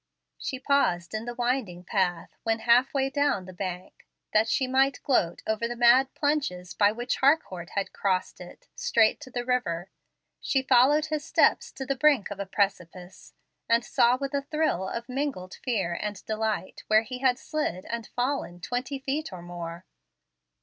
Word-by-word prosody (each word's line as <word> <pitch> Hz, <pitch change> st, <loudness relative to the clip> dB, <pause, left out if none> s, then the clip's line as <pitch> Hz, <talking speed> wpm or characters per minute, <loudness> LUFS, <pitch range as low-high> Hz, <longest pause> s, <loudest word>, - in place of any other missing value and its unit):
She 260 Hz, -, -4 dB
paused 180 Hz, -, +1 dB
in 215 Hz, +1 st, -3 dB
the 240 Hz, 0 st, -5 dB
winding 240 Hz, -8 st, -1 dB
path 180 Hz, -3 st, -1 dB
when 225 Hz, -1 st, 0 dB
half 245 Hz, +3 st, +4 dB
way 270 Hz, -1 st, 0 dB
down 285 Hz, -10 st, +1 dB
the 185 Hz, -, -10 dB
bank, 180 Hz, -1 st, -6 dB, 0.3 s
that 215 Hz, +1 st, +4 dB
she 260 Hz, -, +2 dB
might 265 Hz, +2 st, +2 dB
gloat 175 Hz, -11 st, +1 dB
over 220 Hz, +1 st, 0 dB
the 240 Hz, -, -5 dB
mad 240 Hz, +3 st, +5 dB
plunges 275 Hz, -, -1 dB
by 205 Hz, -1 st, +4 dB
which 240 Hz, +3 st, -2 dB
Harcourt 225 Hz, -, +1 dB
had 200 Hz, -1 st, -2 dB
crossed 185 Hz, -2 st, -1 dB
it, 180 Hz, -, -12 dB
straight 225 Hz, -2 st, +3 dB
to -, -, -10 dB
the 245 Hz, -1 st, -4 dB
river. 190 Hz, -9 st, -1 dB, 0.5 s
She 265 Hz, -1 st, 0 dB
followed 270 Hz, +4 st, +5 dB
his 310 Hz, -1 st, -3 dB
steps -, -, +2 dB
to 265 Hz, -, -6 dB
the 275 Hz, -, -1 dB
brink 270 Hz, -6 st, +3 dB
of 200 Hz, -, -6 dB
a 200 Hz, -, -4 dB
precipice, 185 Hz, -2 st, -3 dB, 0.3 s
and 230 Hz, +1 st, +3 dB
saw 245 Hz, -1 st, +3 dB
with 275 Hz, +1 st, -4 dB
a 280 Hz, -, +1 dB
thrill 300 Hz, -, -1 dB
of 235 Hz, 0 st, -5 dB
mingled 260 Hz, -9 st, -4 dB
fear 195 Hz, -9 st, -1 dB
and 205 Hz, -2 st, -5 dB
delight 220 Hz, -2 st, -2 dB
where 215 Hz, +1 st, +5 dB
he 250 Hz, +2 st, -7 dB
had 255 Hz, -2 st, +3 dB
slid 265 Hz, -, -3 dB
and 230 Hz, -1 st, -5 dB
fallen 245 Hz, -8 st, -2 dB
twenty 250 Hz, +8 st, -3 dB
feet 275 Hz, +2 st, -3 dB
or 180 Hz, -2 st, -8 dB
more. 175 Hz, 0 st, -7 dB
235 Hz, 175 wpm, -27 LUFS, 185-265 Hz, 0.5 s, mad